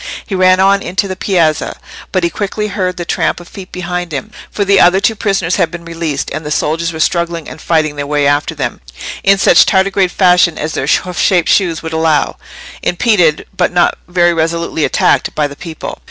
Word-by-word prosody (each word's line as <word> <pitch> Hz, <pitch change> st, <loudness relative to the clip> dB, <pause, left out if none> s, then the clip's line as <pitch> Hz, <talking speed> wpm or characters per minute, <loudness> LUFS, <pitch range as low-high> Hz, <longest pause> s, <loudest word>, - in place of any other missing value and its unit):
He -, -, -7 dB
ran 185 Hz, 0 st, +4 dB
on 195 Hz, +1 st, +3 dB
into 185 Hz, +2 st, -2 dB
the 185 Hz, -, -4 dB
piazza, 170 Hz, -6 st, 0 dB, 0.3 s
but 185 Hz, -2 st, 0 dB
he 170 Hz, -, +1 dB
quickly 210 Hz, +1 st, -3 dB
heard 185 Hz, -3 st, -2 dB
the 175 Hz, -, -4 dB
tramp -, -, -1 dB
of 175 Hz, -, -13 dB
feet 190 Hz, 0 st, -11 dB
behind 180 Hz, -1 st, -4 dB
him, 155 Hz, +9 st, -5 dB, 0.2 s
for 205 Hz, -, -2 dB
the 200 Hz, 0 st, +4 dB
other 185 Hz, +1 st, +5 dB
two 215 Hz, +3 st, +1 dB
prisoners 195 Hz, -5 st, -1 dB
had 165 Hz, -, +1 dB
been 170 Hz, +1 st, -9 dB
released, 165 Hz, -4 st, -3 dB
and 155 Hz, +2 st, -4 dB
the 150 Hz, -, -5 dB
soldiers 165 Hz, +2 st, -1 dB
were 160 Hz, -, -7 dB
struggling 170 Hz, -1 st, -1 dB
and -, -, -10 dB
fighting 155 Hz, -3 st, 0 dB
their 145 Hz, 0 st, -4 dB
way 145 Hz, -1 st, +1 dB
after 145 Hz, +1 st, +1 dB
them, -, -, -4 dB, 0.4 s
in 195 Hz, 0 st, +4 dB
such -, -, +6 dB
tardigrade 190 Hz, 0 st, +2 dB
fashion 180 Hz, -2 st, +3 dB
as 155 Hz, +1 st, -3 dB
their 135 Hz, -, -2 dB
hoof 180 Hz, +3 st, 0 dB
shaped 180 Hz, -4 st, +2 dB
shoes 170 Hz, -5 st, +1 dB
would 160 Hz, 0 st, -5 dB
allow—impeded, 165 Hz, +3 st, 0 dB
but 180 Hz, -, +1 dB
not 175 Hz, -1 st, +2 dB
very 175 Hz, -1 st, +2 dB
resolutely 165 Hz, -1 st, -1 dB
attacked, -, -, +1 dB
by 150 Hz, -, +1 dB
the 140 Hz, -, -10 dB
people. 160 Hz, +1 st, -8 dB
175 Hz, 200 wpm, -14 LUFS, 160-190 Hz, 0.4 s, such